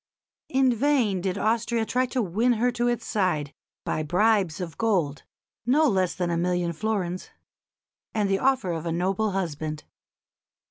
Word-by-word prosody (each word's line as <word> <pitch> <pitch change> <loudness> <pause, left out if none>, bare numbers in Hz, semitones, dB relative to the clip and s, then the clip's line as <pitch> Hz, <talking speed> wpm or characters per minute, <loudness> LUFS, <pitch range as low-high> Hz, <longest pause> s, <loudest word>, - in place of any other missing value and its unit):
In 265 -1 +3
vain 235 -7 +2
did 185 +1 -2
Austria 225 +2 +1
try 255 +3 +1
to 250 -1 -1
win 220 +7 +2
her 240 +2 +1
to 240 0 0
its 240 -1 -1
side 175 -9 0 0.3
by - - -1
bribes 185 +1 +2
of 170 -4 -5
gold 175 -11 +1 0.4
(no 295 +6 +4
less 190 -6 +1
than 175 -2 -1
a 170 - 0
million 175 0 0
florins) 185 -1 -2 0.8
and 210 -2 0
the 195 0 +1
offer 260 -9 +2
of 165 0 -3
a - - -1
noble 190 +6 0
husband. 155 -5 -3
195 Hz, 155 wpm, -26 LUFS, 175-235 Hz, 0.8 s, no